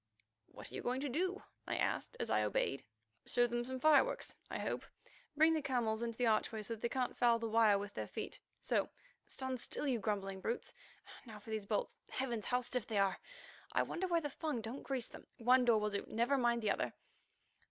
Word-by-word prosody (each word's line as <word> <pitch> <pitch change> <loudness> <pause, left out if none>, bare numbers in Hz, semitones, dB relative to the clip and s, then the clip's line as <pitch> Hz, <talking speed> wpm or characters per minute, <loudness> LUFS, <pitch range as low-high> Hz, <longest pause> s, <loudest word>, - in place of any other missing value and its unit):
"What - - -10
are - - -14
you - - -4
going 250 +2 -1
to 285 - -1
do?" 370 +8 -1 0.2
I - - -1
asked 485 - -1
as - - -2
I - - +4
obeyed. - - 0 0.4
"Show 245 - +4
them 240 0 -1
some 260 +1 -4
fireworks, 310 - +4
I - - -3
hope. - - -2 0.5
Bring 320 +1 +6
the 315 - +1
camels 235 -5 0
into 230 -1 -3
the 245 - +2
archway 220 -1 +1
so 230 - -3
that 225 - -8
they 235 - 0
can't 255 0 -1
foul 235 -1 +4
the 230 0 -3
wire 220 -2 +5
with 200 0 -5
their - - -4
feet. - - -6 0.2
So—stand 260 - -3
still, 295 - -3
you 250 -4 +1
grumbling 195 -2 -2
brutes! 230 +4 -2 0.5
Now 220 -2 -8
for 215 +2 -10
these 215 -2 -3
bolts. - - -1
Heavens! 240 -5 -2
how 250 0 +2
stiff 250 -2 -1
they 220 - -1
are. 195 -1 +2 0.5
I - - +3
wonder 375 +2 -2
why 340 -2 +2
the 290 -2 -3
Fung 300 -4 -2
don't 225 +5 -5
grease 260 -4 -2
them. - - -12
One 250 +2 +5
door 230 -3 +5
will 210 0 0
do—never 230 +6 +1
mind 240 -3 +2
the 210 - +3
other." - - -1
240 Hz, 210 wpm, -36 LUFS, 220-270 Hz, 0.5 s, Bring